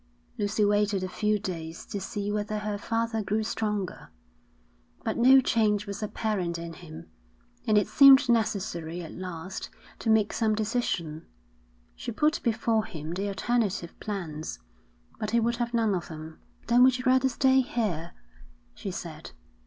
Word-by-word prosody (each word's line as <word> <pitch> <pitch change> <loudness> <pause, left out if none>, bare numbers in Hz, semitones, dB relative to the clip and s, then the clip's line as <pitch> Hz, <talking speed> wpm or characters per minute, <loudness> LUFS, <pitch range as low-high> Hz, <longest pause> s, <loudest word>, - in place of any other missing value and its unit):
Lucy 205 +1 +1
waited 205 -1 +2
a - - -1
few 210 +3 0
days 170 -4 -6
to 200 - -5
see 205 0 -3
whether 210 0 -2
her 210 0 -3
father 225 +1 -1
grew 215 +2 -1
stronger, 210 -4 -3 0.9
but - - -1
no 260 +3 +7
change 215 -4 +2
was 200 0 -6
apparent 210 -5 -2
in 170 0 -6
him, 160 -2 -11 0.6
and 215 - +4
it 205 - +3
seemed 275 -1 +8
necessary 190 -7 -1
at 160 - -8
last 185 0 -6 0.3
to - - -2
make 220 -2 +3
some 220 -2 +1
decision. 210 -8 -2 0.7
She - - -5
put 305 +6 +1
before 225 -1 +1
him 155 0 -6
the 195 +3 -2
alternative 200 -3 -1
plans, 170 -7 -5 0.6
but 215 - -2
he 235 - +3
would 235 +1 0
have 240 -1 -2
none 225 -3 +2
of 175 -3 -2
them. 155 0 -9 0.3
'Then 240 +1 +4
would 255 0 +5
you 250 - -6
rather 260 +1 +4
stay 265 +1 +4
here?' 195 -10 -2 0.6
she - - -6
said. - - -7
210 Hz, 155 wpm, -28 LUFS, 180-230 Hz, 0.9 s, seemed